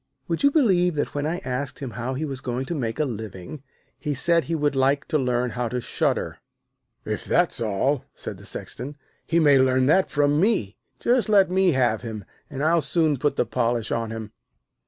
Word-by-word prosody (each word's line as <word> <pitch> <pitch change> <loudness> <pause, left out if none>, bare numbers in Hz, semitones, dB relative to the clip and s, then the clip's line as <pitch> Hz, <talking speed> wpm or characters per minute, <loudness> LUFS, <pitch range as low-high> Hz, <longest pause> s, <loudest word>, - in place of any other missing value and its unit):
'Would 165 - -2
you 280 - +6
believe 190 - +3
that 145 - -2
when 145 +1 -1
I 170 +3 -1
asked 130 +2 -3
him 135 -4 -6
how 120 +3 -4
he 155 +4 -2
was 135 -3 -5
going 125 +1 -3
to 170 - -4
make 115 -8 -3
his 155 - +1
living, 110 +1 -7 0.4
he 150 -2 -2
said 170 +4 +2
he 165 - -2
would 145 -2 0
like 135 +1 +2
to 155 -2 +2
learn 125 -1 0
how 125 -1 -2
to 125 - -2
shudder?' - - -1 0.7
'If - - -3
that's - - +2
all,' 115 +6 0
said - - -7
the - - -13
Sexton, 140 +4 -6 0.3
'he 170 - +2
may 145 -4 +5
learn 130 0 +3
that 185 +7 +3
from 145 +1 +2
me. 185 - +1 0.2
Just 240 -2 +2
let 195 -3 +5
me 190 -2 +3
have 120 -4 +2
him, 110 -4 -6 0.2
and 140 -1 -4
I'll 165 +1 +3
soon 155 0 +2
put 145 +3 0
the - - +1
polish 120 -1 -1
on 115 -1 -1
him.' 110 -1 -6
140 Hz, 205 wpm, -24 LUFS, 120-160 Hz, 0.7 s, you